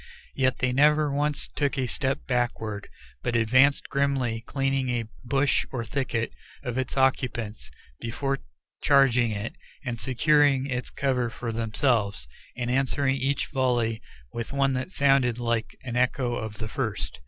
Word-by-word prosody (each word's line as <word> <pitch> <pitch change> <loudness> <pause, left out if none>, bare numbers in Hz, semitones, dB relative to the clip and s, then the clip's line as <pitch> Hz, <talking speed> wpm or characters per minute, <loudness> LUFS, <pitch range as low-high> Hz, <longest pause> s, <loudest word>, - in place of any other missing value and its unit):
Yet 130 -1 +1
they 130 -1 0
never 150 +1 +4
once 145 +1 0
took 145 -1 -1
a 130 - +1
step 135 +2 -1
backward, 115 -5 -2 0.3
but 120 - -1
advanced 130 +5 +4
grimly, 135 -5 0
cleaning 135 -1 0
a 120 -2 0 0.2
bush 135 +3 +2
or 120 -3 -3
thicket 115 -1 -2 0.3
of 125 -2 -3
its 130 +1 -3
occupants 120 - 0 0.3
before 135 +4 -2 0.4
charging 125 -4 +4
it, 105 +1 -4 0.3
and 120 -2 -3
securing 140 +1 +3
its 125 -3 -3
cover 130 -3 0
for 115 0 -5
themselves, 110 - 0 0.3
and 120 -1 -1
answering 135 +1 +1
each 135 +2 0
volley 120 -4 +1 0.3
with 115 +2 -4
one 135 -1 +2
that 130 +6 -2
sounded 135 -7 +3
like 115 -2 -1
an 125 -2 -5
echo 125 0 +1
of 110 -3 -4
the 110 - -4
first. 110 -2 -3
125 Hz, 145 wpm, -26 LUFS, 115-135 Hz, 0.4 s, never